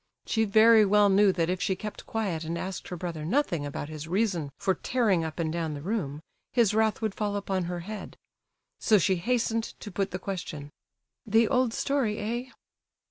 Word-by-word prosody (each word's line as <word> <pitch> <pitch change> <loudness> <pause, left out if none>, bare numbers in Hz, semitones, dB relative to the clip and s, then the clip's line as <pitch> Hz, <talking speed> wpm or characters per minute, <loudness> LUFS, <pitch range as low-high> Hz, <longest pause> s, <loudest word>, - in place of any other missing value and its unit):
She 220 -1 +1
very 220 +2 +6
well 205 0 +5
knew 200 0 +5
that 165 -2 0
if 180 +1 -1
she 190 - +1
kept 210 +3 -7
quiet 195 -8 -2
and 165 +1 -3
asked 190 +2 -5
her 180 - -5
brother 170 -3 -5
nothing 170 - 0
about 145 0 -5
his 155 0 -7
reason 180 -6 0
for 190 - +1
tearing 210 -7 +1
up 160 -1 -5
and 160 -2 -1
down 165 -3 -2
the 145 - -7
room, 160 -7 -3 0.3
his 230 -5 +3
wrath 220 0 +1
would 215 -3 0
fall 205 -1 -2
upon 195 -3 -1
her 175 0 -4
head. 210 +4 -8 0.6
So 215 - +4
she 190 0 +2
hastened 230 +2 -1
to 205 - -8
put 195 +1 -1
the 180 - -4
question: 175 -6 -6 0.6
"The 225 +1 +4
old 255 -1 +2
story, 245 -4 0
eh?" 240 +4 -3
195 Hz, 190 wpm, -28 LUFS, 170-220 Hz, 0.6 s, very